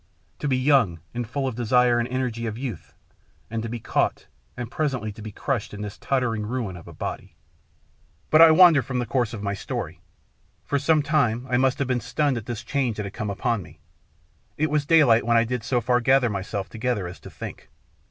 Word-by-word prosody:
To 150 - -2
be 130 -2 +2
young 130 - +3
and 120 -1 -3
full 135 +2 -2
of 130 - -3
the 120 - -4
desire 120 +1 +3
and 120 - -1
energy 125 -2 -2
of 110 0 -4
youth, 120 - -6 0.6
and 115 0 -2
to 115 - -4
be 120 +1 -4
caught, - - -1 0.3
and 120 -1 -5
presently 130 -8 -1
to 110 - -12
be 110 0 -7
crushed 115 -1 -3
in 105 - -6
this 105 -1 -7
tottering 125 -5 0
ruin 110 -4 -3
of 85 - -12
a - - -9
body.... - - -6 1.0
But 155 - +7
I 165 - +10
wander 160 -2 +7
from 130 0 -4
the 125 - 0
course 120 -1 0
of 110 -4 -6
my 100 0 -1
story. 100 - -5 0.6
For 140 - 0
some 150 +2 +3
time 130 -6 +1
I 120 - +3
must 130 +1 +2
have 140 -3 -1
been 125 -2 0
stunned 145 -1 0
at 115 - -7
this 120 -2 -4
change 130 -6 -1
that 105 - -3
had 100 - -7
come 105 - -4
upon 115 +2 -1
me. 80 -2 -14 0.8
It 155 0 0
was 150 -1 0
daylight 145 -9 +5
when 115 +1 +3
I 115 - +5
did 120 -1 -3
so 125 +1 +1
far 125 +2 +2
gather 130 -1 +3
myself 100 0 -4
together 115 -3 -2
as 85 - -8
to - - -11
think. - - -9
120 Hz, 220 wpm, -24 LUFS, 110-135 Hz, 1.0 s, I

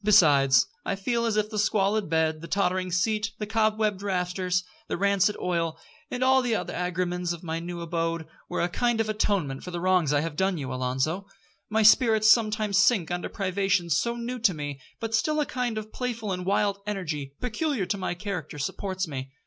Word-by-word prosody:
Besides, 140 -10 +6 0.2
I - - -1
feel 235 +4 0
as 215 -2 0
if 215 +1 0
the 210 - -2
squalid 205 -1 +1
bed, 160 -1 +1
the 165 - -7
tottering 185 -1 0
seat, 210 +4 0
the 210 - -3
cobwebbed 215 -2 +1
rafters, 180 -1 -1 0.2
the - - -2
rancid 200 +1 +2
oil, 165 -3 -1 0.3
and 250 -3 -2
all 265 0 +5
the 240 -3 0
other - - -3
agremens 180 0 -1
of 170 - -10
my 165 -1 -3
new 170 0 -6
abode, 165 -1 -2 0.2
were - - -1
a - - +2
kind 240 +5 0
of 220 -1 0
atonement 195 -10 0
for - - -6
the 175 -1 -4
wrongs 180 -4 +2
I 145 -1 +3
have 165 -1 -4
done 190 +1 +1
you, 135 -4 -4
Alonzo. 130 +9 -1 0.4
My 220 0 +2
spirits 220 0 +6
sometimes 215 -3 +3
sink 205 -5 +3
under 175 0 -2
privations 185 -4 0
so 235 +7 0
new 240 +1 -4
to 210 -6 +3
me, 145 -2 -5 0.2
but 225 -1 -4
still 305 +8 +2
a 300 - +2
kind 245 -4 -2
of 215 0 -6
playful 230 -5 -3
and 180 0 -3
wild 200 0 +1
energy, 155 -9 -4
peculiar 250 - -1
to 200 - -1
my 185 -1 -2
character, 180 -6 -5
supports 185 +5 -3
me. 135 -3 -5
190 Hz, 195 wpm, -27 LUFS, 170-215 Hz, 0.4 s, Besides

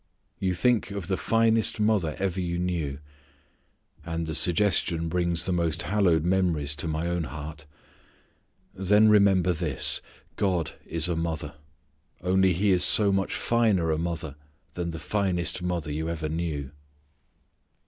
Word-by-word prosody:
You 95 -1 -1
think 120 +4 +1
of 100 -3 -6
the 95 - 0
finest 115 +1 +1
mother 105 -8 +1
ever 95 -1 -2
you 85 -1 -3
knew. 85 -6 -2 1.1
And 85 0 -4
the 80 - -4
suggestion 85 -1 +1
brings 85 -1 -1
the 95 - -1
most 85 -1 0
hallowed 90 -5 +2
memories 85 -6 +1
to 85 - -3
my 80 +1 -2
own 85 -1 -2
heart. 75 +2 -8 1.1
Then 105 +3 +3
remember 95 -4 +4
this: 80 -5 +2 0.4
God 90 -6 0 0.2
is 85 0 0
a 85 - -1
mother, 80 -1 -4 0.7
only 95 +1 +3
He 100 +4 +1
is 90 -1 +2
so 105 -2 +7
much 95 0 -1
finer 105 -8 +1
a 80 - -1
mother 80 -4 -4 0.4
than 85 -1 -4
the 80 - -6
finest 90 -2 -1
mother 85 -4 -3
you 80 +2 -3
ever 80 -2 -4
knew. 80 -4 -4
85 Hz, 145 wpm, -26 LUFS, 80-95 Hz, 1.1 s, so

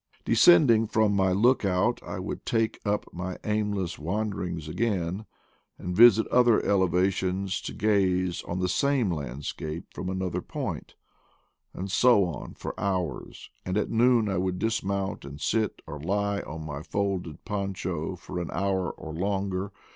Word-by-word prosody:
Descending 115 -10 +6
from 105 -1 +2
my 95 -1 +3
look 115 +8 +3
out, 95 +5 +1
I - - -6
would 95 +2 -5
take 115 -1 0
up 105 0 0
my 90 +1 -4
aimless 105 -4 -1
wanderings 90 -2 -3
again, 95 +1 -2 0.5
and 90 0 -4
visit 110 0 +7
other 120 -2 +5
elevations 95 0 +1
to - - -5
gaze 95 -4 +1
on 85 - -3
the 90 0 0
same 130 0 +1
landscape 75 +2 -5
from 90 - -4
another 95 -1 -2
point; 125 - -5 0.8
and 95 +1 -6
so 115 -2 +5
on 85 -5 -6
for - - -5
hours, 90 -8 -3
and 90 +2 -2
at 105 - -1
noon 120 -1 +4
I 95 -3 0
would 95 0 -1
dismount 100 -2 -1
and 70 +1 -9
sit 110 +6 -1
or 75 -2 -7
lie 100 +5 0
on 80 -2 -7
my 75 -1 -5
folded 95 -3 -3
poncho 95 -4 -3
for 90 0 -6
an 85 - -4
hour 95 -2 0
or 80 - -8
longer. 95 +2 -2
95 Hz, 150 wpm, -27 LUFS, 90-105 Hz, 0.8 s, visit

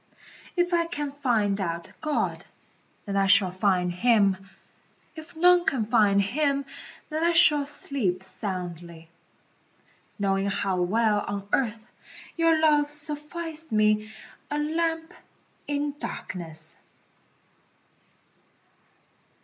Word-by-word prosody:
If 350 0 +1
I 335 -1 +2
can 295 -4 -4
find 225 -8 0
out 170 -2 -4
God, 305 -1 -1 0.6
then 200 - -4
I 195 0 +2
shall 195 -2 +5
find 185 -1 +1
Him, 195 -1 +2 0.7
If 315 0 -11
none 355 +2 +5
can 250 -9 0
find 210 -3 +3
Him, 280 +7 0 0.5
then 310 +1 -1
I 340 0 +3
shall 295 -4 +6
sleep 225 -11 -2
soundly, 175 -4 -5 1.1
Knowing 195 -1 0
how 195 -2 -1
well 210 +3 +2
on 200 -1 -4
earth 225 -3 0 0.5
your 330 -1 +3
love 295 -2 +3
sufficed 305 +1 -3
me, 215 0 +2 0.4
A 295 - -2
lamp 325 +2 -1 0.5
in 290 0 -1
darkness. 165 -2 -6
225 Hz, 105 wpm, -26 LUFS, 195-300 Hz, 1.1 s, shall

